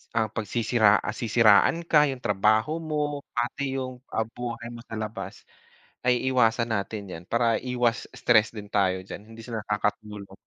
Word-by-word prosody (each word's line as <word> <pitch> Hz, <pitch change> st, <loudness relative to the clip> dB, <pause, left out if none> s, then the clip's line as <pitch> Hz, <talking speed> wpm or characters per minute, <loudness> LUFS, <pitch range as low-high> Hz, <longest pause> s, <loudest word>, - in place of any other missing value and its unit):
Ah, 110 Hz, -2 st, +1 dB
pagsisira 110 Hz, 0 st, +1 dB, 0.2 s
ah, 105 Hz, -, -4 dB
sisiraan 110 Hz, +3 st, +5 dB
ka, 150 Hz, -1 st, +6 dB
yung 130 Hz, -2 st, -5 dB
trabaho 110 Hz, +7 st, +2 dB
mo, 150 Hz, -3 st, -3 dB
pati 120 Hz, +3 st, -2 dB, 0.2 s
yung 130 Hz, -1 st, -6 dB, 0.4 s
buhay 120 Hz, -1 st, -5 dB
mo 120 Hz, 0 st, -10 dB
sa -, -, -11 dB
labas 105 Hz, -3 st, -5 dB, 0.7 s
ay 125 Hz, -1 st, +4 dB
iwasan 115 Hz, -2 st, +2 dB
natin 105 Hz, 0 st, -2 dB
yan 80 Hz, -, -7 dB
para 115 Hz, -1 st, +2 dB
iwas 125 Hz, -2 st, 0 dB
stress 110 Hz, -2 st, +4 dB
din 105 Hz, -2 st, -8 dB
tayo 95 Hz, -2 st, +1 dB
diyan 100 Hz, -, -8 dB
hindi 115 Hz, 0 st, -11 dB
sila 115 Hz, -2 st, -4 dB
nakakatulong. 105 Hz, -1 st, -3 dB
115 Hz, 155 wpm, -26 LUFS, 105-125 Hz, 0.7 s, ka